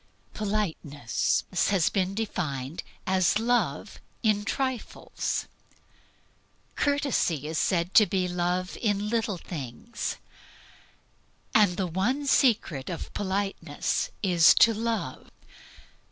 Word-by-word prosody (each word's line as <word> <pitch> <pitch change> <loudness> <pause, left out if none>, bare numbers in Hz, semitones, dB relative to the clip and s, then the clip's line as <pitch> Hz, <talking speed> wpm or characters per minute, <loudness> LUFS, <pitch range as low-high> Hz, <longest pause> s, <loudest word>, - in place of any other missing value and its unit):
Politeness 175 - -1 0.2
has 190 -5 +3
been 195 -1 -1
defined 160 -9 -3 0.2
as 185 +1 +3
love 240 +2 0 0.2
in 210 -2 +2
trifles. 260 +2 -3 1.3
Courtesy 280 - 0
is 155 +1 -2
said 175 0 0
to 215 - +7
be 185 0 0
love 180 +1 -2
in 205 -2 0
little 225 -4 0
things. 165 - -5 1.4
And 205 -5 +4
the 190 - 0
one 200 - -1
secret 215 - +2
of 170 - -6
politeness 195 -6 -2
is 175 -4 +6
to 230 - +6
love. 220 - -3
195 Hz, 95 wpm, -27 LUFS, 170-220 Hz, 1.4 s, to